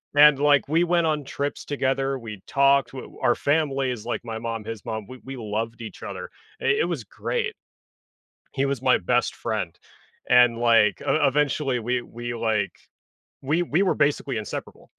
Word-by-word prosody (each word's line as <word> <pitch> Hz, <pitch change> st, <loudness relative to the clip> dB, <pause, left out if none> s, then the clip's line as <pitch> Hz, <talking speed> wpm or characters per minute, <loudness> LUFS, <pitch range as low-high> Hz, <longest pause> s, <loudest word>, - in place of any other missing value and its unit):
And, 145 Hz, -1 st, +7 dB
like, 145 Hz, -1 st, +4 dB
we 165 Hz, +3 st, +3 dB
went 175 Hz, -1 st, +2 dB
on 150 Hz, -2 st, 0 dB
trips 140 Hz, +2 st, -3 dB
together, 135 Hz, -1 st, 0 dB
we 110 Hz, -5 st, -8 dB
talked, 140 Hz, 0 st, +3 dB
w 130 Hz, -, -9 dB
our 120 Hz, -, +3 dB
family 140 Hz, -3 st, +1 dB
is 115 Hz, -3 st, -6 dB
like 120 Hz, -, -2 dB
my 115 Hz, -1 st, -4 dB
mom, 115 Hz, -1 st, -4 dB
his 115 Hz, -2 st, -6 dB
mom- 110 Hz, -2 st, -4 dB
we 130 Hz, -, -10 dB
we 135 Hz, +1 st, -7 dB
loved 115 Hz, +1 st, -4 dB
each 110 Hz, -, -9 dB
other. -, -, -6 dB, 0.3 s
I -, -, -4 dB, 0.2 s
It -, -, 0 dB
was -, -, -3 dB
great. 465 Hz, -2 st, -3 dB, 1.0 s
He 135 Hz, 0 st, +1 dB
was 135 Hz, -3 st, -2 dB
my -, -, +4 dB
best -, -, 0 dB
friend. -, -, -3 dB, 0.5 s
And, 125 Hz, -2 st, +6 dB
like, 115 Hz, -3 st, +4 dB
e -, -, -3 dB
e 150 Hz, -2 st, +3 dB
eventually, 145 Hz, -2 st, +1 dB
we 120 Hz, +2 st, -1 dB
we, 120 Hz, 0 st, -6 dB
like 110 Hz, -2 st, 0 dB, 0.7 s
we 150 Hz, +6 st, +1 dB
we 175 Hz, +2 st, +1 dB
were 190 Hz, -, +2 dB
basically 140 Hz, -4 st, +1 dB
inseparable. 105 Hz, -, -7 dB
135 Hz, 180 wpm, -24 LUFS, 115-145 Hz, 1.0 s, And